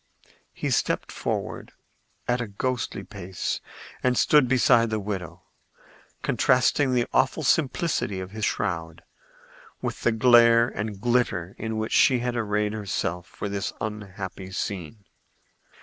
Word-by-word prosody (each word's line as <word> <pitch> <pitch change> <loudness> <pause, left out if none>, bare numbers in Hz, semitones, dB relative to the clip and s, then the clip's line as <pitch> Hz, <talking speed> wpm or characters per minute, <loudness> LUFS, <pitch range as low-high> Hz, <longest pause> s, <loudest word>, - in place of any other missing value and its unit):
He - - -3
stepped - - 0
forward - - -4 0.5
at 125 0 +1
a 115 - -3
ghostly 110 -1 -3
pace 95 -3 -4 0.4
and 125 -1 +2
stood 150 -4 +5
beside 120 -2 +4
the 110 -1 -1
widow, 95 -5 -5 0.8
contrasting 130 +1 +3
the 120 -1 +2
awful 145 +4 +2
simplicity 145 - +1
of 95 0 -6
his 110 0 -6
shroud 80 -4 -2 0.8
with - - -4
the 120 - +3
glare 115 0 +6
and 105 -3 -5
glitter 110 -7 0
in 110 0 -3
which 110 0 -2
she 130 - +5
had 120 0 -2
arrayed 105 -2 0
herself 95 -4 -3
for - - -6
this 100 0 -3
unhappy 95 -3 -6
scene. 100 +1 -5
110 Hz, 130 wpm, -25 LUFS, 100-120 Hz, 0.8 s, glare